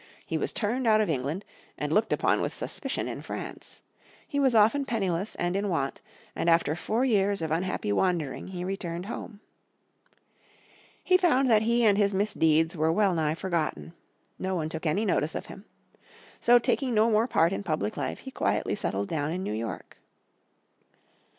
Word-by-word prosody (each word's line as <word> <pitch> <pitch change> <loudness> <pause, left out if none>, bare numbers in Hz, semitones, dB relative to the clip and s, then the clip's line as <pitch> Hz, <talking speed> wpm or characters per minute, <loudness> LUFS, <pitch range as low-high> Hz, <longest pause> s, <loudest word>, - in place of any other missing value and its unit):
He - - -4
was - - 0
turned 235 +3 -1
out 215 -1 +5
of 210 -6 +1
England, 145 +7 -3 0.3
and - - -2
looked - - +2
upon - - +2
with - - -2
suspicion - - -3
in - - -5
France. - - -8 0.4
He 285 - -2
was 265 -4 +3
often 225 +7 +4
penniless 200 -6 -2
and 175 +1 -1
in 200 +1 0
want, 140 -6 -2 0.3
and 170 - 0
after 165 -2 +3
four 220 +8 0
years 200 -4 +2
of 160 -2 -3
unhappy 170 - -1
wandering 165 - 0
he 180 -1 -5
returned 180 -2 -4
home. 210 0 -7 1.6
He 365 - +5
found 275 -9 +3
that 215 -1 +5
he 235 +1 +2
and 205 -1 +4
his 200 -1 +2
misdeeds 165 -5 +2
were 160 0 +2
well 195 +2 +2
nigh 155 -2 0
forgotten. 170 -2 -2 0.5
No 190 0 -2
one 160 -3 -2
took 160 +1 -4
any 195 +8 +1
notice 160 -5 0
of - - -4
him. 195 - -11 0.7
So 240 +1 +6
taking 250 +1 0
no 220 +2 +4
more 220 +2 +3
part 165 -5 +2
in - - -3
public 155 - -2
life - - -4
he - - -8
quietly - - 0
settled 100 +1 -2
down 150 -1 -2
in 185 +2 -3
New 105 - -3
York. 110 +1 -6
190 Hz, 175 wpm, -27 LUFS, 160-215 Hz, 1.6 s, So